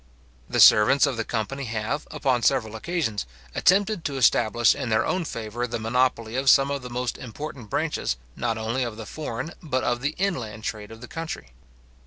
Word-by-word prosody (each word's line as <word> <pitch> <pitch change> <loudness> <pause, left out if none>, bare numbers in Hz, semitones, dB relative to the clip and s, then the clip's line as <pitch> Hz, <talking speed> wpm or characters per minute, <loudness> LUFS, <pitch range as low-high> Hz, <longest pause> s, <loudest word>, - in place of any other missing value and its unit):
The - - 0
servants 130 +7 +7
of 140 -3 -1
the 115 - -2
company 120 +5 -3
have, 115 +6 -3
upon 130 -3 0
several 110 -2 +1
occasions, 115 - -2 0.3
attempted 200 0 +3
to 140 -2 -2
establish 120 -2 +4
in 130 -4 -4
their 110 +1 +2
own 185 -2 -1
favour 115 -1 -4
the 115 - -3
monopoly 115 0 0
of 135 +1 +2
some 135 +1 +5
of 140 -1 -2
the 125 - -8
most 125 0 -3
important 125 -1 -7
branches, 155 - -1 0.2
not 115 -2 -1
only 115 +4 -2
of 120 -3 -3
the 110 - -7
foreign, 155 +2 -5
but 130 -6 -1
of 120 0 0
the 145 +3 -1
inland 120 - -2
trade 105 -1 -4
of 115 0 -12
the 125 - -8
country. 165 - -6
125 Hz, 190 wpm, -25 LUFS, 110-140 Hz, 0.3 s, servants